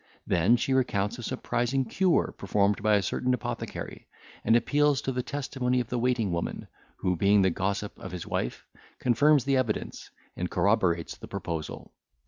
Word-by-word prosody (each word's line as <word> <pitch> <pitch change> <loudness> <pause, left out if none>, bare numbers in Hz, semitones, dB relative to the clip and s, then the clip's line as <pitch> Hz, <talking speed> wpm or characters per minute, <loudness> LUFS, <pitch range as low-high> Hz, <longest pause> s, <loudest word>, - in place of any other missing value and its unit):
Then 90 +7 +4
she 135 - 0
recounts 120 -3 0
a - - -5
surprising 130 +2 -1
cure 180 +9 +1
performed 100 +1 +1
by 105 0 +4
a 100 - +2
certain 125 +7 0
apothecary, - - -6 0.4
and 115 - +4
appeals 145 +4 +3
to 135 - -1
the 125 0 -1
testimony 125 -2 -1
of 120 -2 -3
the 125 - -1
waiting 120 -5 +1
woman, 85 0 -3 0.3
who 90 0 0
being 100 +3 +4
the 95 - +3
gossip 100 +3 -3
of - - -7
his 90 -2 -6
wife, - - -3 0.3
confirms 145 +3 +4
the 135 -1 +2
evidence, 115 -5 -2 0.3
and 90 0 -3
corroborates 90 -6 +1
the - - -10
proposal. 80 -2 -5
115 Hz, 165 wpm, -28 LUFS, 100-130 Hz, 0.4 s, Then